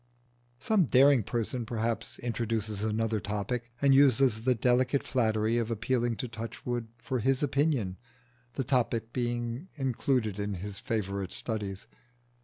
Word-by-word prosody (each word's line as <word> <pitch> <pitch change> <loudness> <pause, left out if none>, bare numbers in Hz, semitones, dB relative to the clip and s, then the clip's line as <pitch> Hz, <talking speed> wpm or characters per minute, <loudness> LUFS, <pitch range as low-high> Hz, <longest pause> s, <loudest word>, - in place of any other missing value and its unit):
Some 195 +5 +3
daring 135 -1 +5
person 120 +3 -2
perhaps 115 0 -2
introduces 110 -3 -2
another 110 0 0
topic, 110 +4 -3
and 140 -1 +5
uses 130 -4 +4
the 130 -1 +4
delicate 125 +3 +2
flattery 110 -2 +1
of 115 -1 -2
appealing 120 +1 0
to 125 - -4
Touchwood 115 +1 -5
for 125 +2 -3
his 135 +4 +1
opinion, 140 -9 +1 0.6
the 135 - -2
topic 115 -3 0
being 120 +4 -2
included 125 -6 0
in 100 -1 -2
his 100 +2 -6
favourite 100 -5 -2
studies. 100 -4 -3
115 Hz, 130 wpm, -29 LUFS, 110-130 Hz, 0.6 s, daring